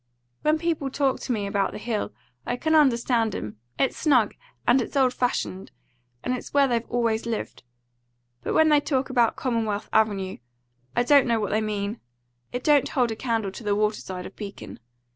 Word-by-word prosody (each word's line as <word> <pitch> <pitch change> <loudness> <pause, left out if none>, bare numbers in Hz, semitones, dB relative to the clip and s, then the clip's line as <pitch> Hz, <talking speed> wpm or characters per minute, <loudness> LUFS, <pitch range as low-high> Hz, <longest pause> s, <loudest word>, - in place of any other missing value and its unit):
When 305 +1 +3
people 315 -4 -1
talk 270 -1 0
to - - -4
me 210 -4 -1
about 200 -1 0
the - - -5
Hill, 215 -1 -2 0.3
I 245 - -2
can 315 +4 0
understand 235 -6 +3
'em. 105 0 -6 0.2
It's 270 - +1
snug, 250 -9 +3 0.3
and 245 +2 +5
it's 240 - -6
old 260 -2 +3
fashioned, 200 -6 -2 0.5
and 250 - 0
it's 250 - -8
where 280 -1 +5
they've 235 -2 -1
always 230 -2 0
lived. 225 -2 -4 0.8
But - - -2
when 315 0 +5
they 295 -1 +5
talk 270 -2 -1
about 240 -3 +3
Commonwealth 220 -4 -2
Avenue, 205 -4 +1 0.6
I 240 - +3
don't 280 +1 +5
know 230 -1 +2
what 210 - -2
they 215 - +2
mean. 210 +1 -3 0.5
It 245 +1 -4
don't 290 -3 +4
hold 245 -5 +1
a - - -3
candle 225 -4 -1
to 230 - -9
the 205 -1 +1
water 210 0 0
side 180 -1 -6
of - - -10
Beacon. 200 -2 -8
235 Hz, 190 wpm, -25 LUFS, 210-265 Hz, 0.8 s, and